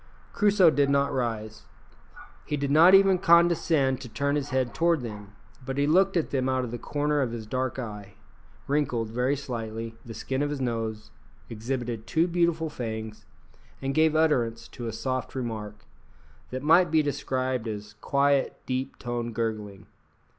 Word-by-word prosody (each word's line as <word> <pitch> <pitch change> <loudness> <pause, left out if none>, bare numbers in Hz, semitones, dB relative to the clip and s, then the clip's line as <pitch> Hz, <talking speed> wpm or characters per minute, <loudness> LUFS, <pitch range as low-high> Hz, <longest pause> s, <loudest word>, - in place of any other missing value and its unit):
Crusoe 200 -5 +5
did 140 -2 +2
not 140 0 +2
rise. 110 -4 -3 0.8
He 150 - -3
did 140 0 -2
not 165 +6 +8
even 195 -1 +5
condescend 165 -6 +3
to 125 - -8
turn 140 +5 -1
his 145 -1 -2
head 130 -3 0
toward 170 -3 +2
them; 105 -3 -8 0.3
but 135 +1 -5
he 140 - +2
looked 185 +5 +3
at 165 - -1
them 130 -1 0
out 130 -1 0
of 120 - -5
the 120 - -5
corner 145 0 0
of 125 -4 -1
his 115 -2 -6
dark 130 +3 -2
eye, 105 -5 -7 0.5
wrinkled 135 -6 0
very 125 +4 +1
slightly 115 -4 -5
the 115 -2 -9
skin 130 +5 -3
of 145 - 0
his 145 -1 -3
nose, 115 -4 -3 0.4
exhibited 115 0 -4
two 165 +1 +2
beautiful 170 -2 +1
fangs, 110 -5 -6 0.5
and 135 0 -2
gave 155 +1 +3
utterance 120 -8 +1
to 120 -3 -7
a - - -2
soft 130 +4 -3
remark, 110 -4 -5 0.6
that 130 +1 -5
might 170 +4 +5
be 155 0 +3
described 130 -4 -2
as 105 -1 -6
quiet, 140 0 +1
deep 130 +1 -3
toned 120 -2 -4
gurgling. 105 -4 -3
130 Hz, 165 wpm, -27 LUFS, 115-150 Hz, 0.8 s, not